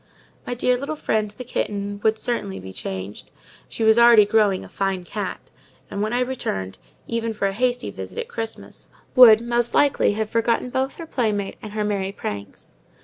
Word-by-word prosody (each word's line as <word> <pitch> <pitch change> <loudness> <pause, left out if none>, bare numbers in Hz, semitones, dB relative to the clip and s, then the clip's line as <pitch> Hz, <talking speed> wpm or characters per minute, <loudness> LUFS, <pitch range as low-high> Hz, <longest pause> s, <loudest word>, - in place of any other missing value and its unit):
My 245 - -2
dear 250 +1 +2
little 280 +4 -4
friend, 215 -7 -1
the 210 +5 -9
kitten, 205 -4 -3
would 220 0 +3
certainly 215 - -3
be 95 0 -9
changed: 95 +2 -6 0.4
she 225 - -4
was 220 +1 +5
already 235 -3 +8
growing 205 -3 +2
a - - -11
fine 195 -2 -2
cat; 200 +1 -6 0.4
and 200 - -3
when 215 +1 -1
I 245 +1 +1
returned, 95 - -3 0.3
even 230 -1 -2
for 205 - -1
a 195 - -2
hasty 245 +3 -1
visit - - -9
at 475 0 -3
Christmas, 225 - -7 0.3
would, 230 -4 +9
most 240 0 +2
likely, 285 -7 +3
have 215 +1 -2
forgotten 230 +2 0
both 265 +1 -1
her 335 - -8
playmate 215 -9 -1
and 215 -1 -8
her 215 0 -1
merry 200 -2 -1
pranks. 100 - -7
220 Hz, 185 wpm, -23 LUFS, 200-245 Hz, 0.4 s, would